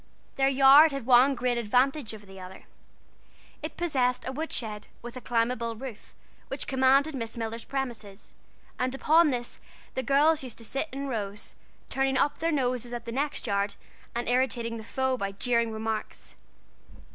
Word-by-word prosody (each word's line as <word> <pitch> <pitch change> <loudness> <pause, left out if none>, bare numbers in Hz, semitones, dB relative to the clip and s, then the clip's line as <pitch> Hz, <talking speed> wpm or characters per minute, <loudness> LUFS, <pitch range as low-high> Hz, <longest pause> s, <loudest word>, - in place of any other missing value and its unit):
Their 270 0 +3
yard 275 +3 +7
had 275 -4 -5
one 260 +2 +6
great 245 -1 0
advantage 250 +3 +1
over 210 -1 -13
the 195 -1 -12
other: 185 0 -10 1.0
it 310 - -6
possessed 255 -8 0
a - - -2
wood 315 +4 -4
shed, 210 -3 -4 0.2
with 240 +1 -8
a 255 - -7
climbable 230 -1 0
roof, 245 -2 -9 0.3
which 270 - -4
commanded 270 +3 +3
Miss 230 -3 -3
Miller's 225 0 -4
premises, 230 -7 -5 0.5
and 255 +1 0
upon 315 +3 +4
this 240 -3 -3 0.3
the 260 - -1
girls 290 +4 +3
used 255 -4 -6
to 230 - -6
sit 275 +7 -2
in 275 +2 -4
rows, 210 -4 -3 0.3
turning 270 0 0
up 290 - +1
their 330 +1 +1
noses 250 -4 -1
at 235 - -7
the 230 - -5
next 280 +4 -1
yard, 200 0 0 0.4
and 240 - -2
irritating 245 -2 0
the 220 - -8
foe 260 +3 -1
by 200 -3 -3
jeering 235 +2 +1
remarks. 220 0 -4
250 Hz, 170 wpm, -28 LUFS, 230-270 Hz, 1.0 s, yard